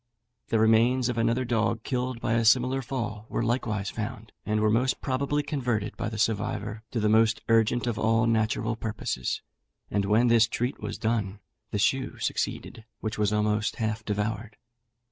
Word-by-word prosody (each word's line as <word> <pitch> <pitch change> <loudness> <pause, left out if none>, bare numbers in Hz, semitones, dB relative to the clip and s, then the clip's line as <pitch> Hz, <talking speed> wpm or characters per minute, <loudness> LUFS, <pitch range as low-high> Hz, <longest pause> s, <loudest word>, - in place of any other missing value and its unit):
The 115 - +1
remains 115 +3 +4
of 120 - -2
another 115 +3 +1
dog, 115 -1 0
killed 125 -2 -2
by 115 - -1
a 115 0 +2
similar 125 +3 +4
fall, 115 -4 -4
were - - -1
likewise 110 -4 -1
found, 110 0 -6 0.2
and 105 0 +1
were 105 0 +3
most 125 +4 +1
probably 140 +2 -1
converted 120 -8 -2
by 115 -1 -3
the 110 - -6
survivor 105 0 -1
to 120 - -2
the 105 - +2
most 110 +1 +3
urgent 115 +2 +3
of 120 -2 -2
all 115 +1 +3
natural 110 0 +1
purposes; 105 - -3 0.5
and 100 0 +1
when 110 +4 +3
this 115 -1 +5
treat 120 +3 -2
was - - -4
done, 110 -3 -1 0.3
the - - -2
shoe 130 +6 0
succeeded, 110 - -3 0.2
which 110 0 -4
was 105 -1 +2
almost 105 +1 +1
half 110 -1 -2
devoured. 105 +1 -3
115 Hz, 170 wpm, -27 LUFS, 105-120 Hz, 0.5 s, this